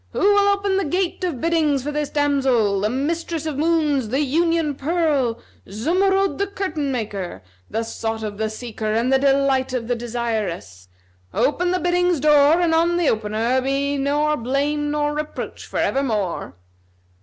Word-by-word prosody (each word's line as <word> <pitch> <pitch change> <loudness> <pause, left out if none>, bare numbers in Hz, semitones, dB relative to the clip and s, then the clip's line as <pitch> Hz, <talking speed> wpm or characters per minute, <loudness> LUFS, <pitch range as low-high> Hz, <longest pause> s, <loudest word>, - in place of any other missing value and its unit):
Who - - -3
will 405 0 +4
open 400 -1 +1
the 390 - +1
gate 360 +4 -1
of 335 -9 -2
biddings 310 -4 +1
for 295 - -3
this 295 -1 -2
damsel, 265 -9 +1
the 210 - +1
mistress 320 +5 -2
of 300 -3 -3
moons, 300 -7 +1
the 265 +5 0
union 325 +1 +1
pearl, 285 -5 0 0.3
Zumurrud 385 - +1
the 400 - +1
curtain 325 -8 -3
maker, 200 - -4 0.3
the 225 - -2
sought 225 0 -4
of 205 -1 -5
the 220 0 0
seeker 220 -1 -4
and 235 +4 +1
the 265 - +4
delight 270 -1 +2
of 240 -3 -2
the 245 - +1
desirous? 220 - -4 0.5
Open 355 +5 +1
the 365 - +1
biddings' 355 -1 +1
door 300 +2 +5
and 335 -2 +2
on 340 +2 +2
the 345 -4 +2
opener 220 +4 0
be 275 +2 0
nor 295 +2 +1
blame 285 +5 -1
nor 295 0 0
reproach 300 0 -5
for - - -5
evermore." 210 - -1
280 Hz, 165 wpm, -21 LUFS, 235-330 Hz, 0.5 s, door